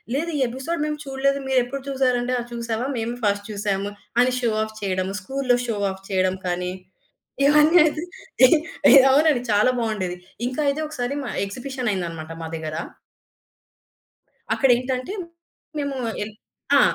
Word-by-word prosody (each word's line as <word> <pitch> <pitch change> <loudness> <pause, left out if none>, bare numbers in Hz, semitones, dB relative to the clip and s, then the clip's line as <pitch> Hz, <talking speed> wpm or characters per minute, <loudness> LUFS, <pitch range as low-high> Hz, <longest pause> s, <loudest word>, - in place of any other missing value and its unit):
లేదు, 330 +4 -1
"ఈ - - -1
ఎపిసోడ్ 265 +7 -4
మేము 300 0 -2
చూడలేదు. 275 +1 0
మీరెప్పుడు 260 +1 0
చూసారు" 260 -2 +2
అంటే, 250 +1 -1
ఆహ్, 240 - -6
చూసావా? 235 +1 -2
మేము 230 +1 -2
ఫస్ట్ 205 0 +1
చూసాము 200 -1 -2 0.3
అని 250 0 +3
షో 235 -3 +1
ఆఫ్ 220 0 -7
చేయడం, 185 -1 -1
స్కూలులో 255 +2 +1
షో 220 -3 -1
ఆఫ్ 190 0 -10
చేయడం 185 -1 +1
కానీ, 180 0 -1 0.8
ఇవన్నీ 300 +4 +6
అయితే 310 +1 0 0.4
ఎహ్ 305 - +5 0.3
ఎహ్ 270 -1 +9
అవునండి. 290 -3 +4
చాలా 210 +5 +4
బావుండేది. 200 -6 -2 0.3
ఇంకా 255 +4 -3
అయితే 285 +3 0
ఒకసారి 280 -2 -3
మా 240 - -4 0.2
ఎక్సిబిషన్ 250 +2 -3
అయిందన్నమాట 165 -3 -4
మా - - -4
దగ్గర. 155 -1 -5 1.8
అక్కడేంటంటే 255 +4 +1 0.7
మేము 280 -2 -2 0.2
యెల్ 210 +1 -5 0.4
ఆ! - - +7
245 Hz, 145 wpm, -23 LUFS, 205-275 Hz, 1.8 s, ఎహ్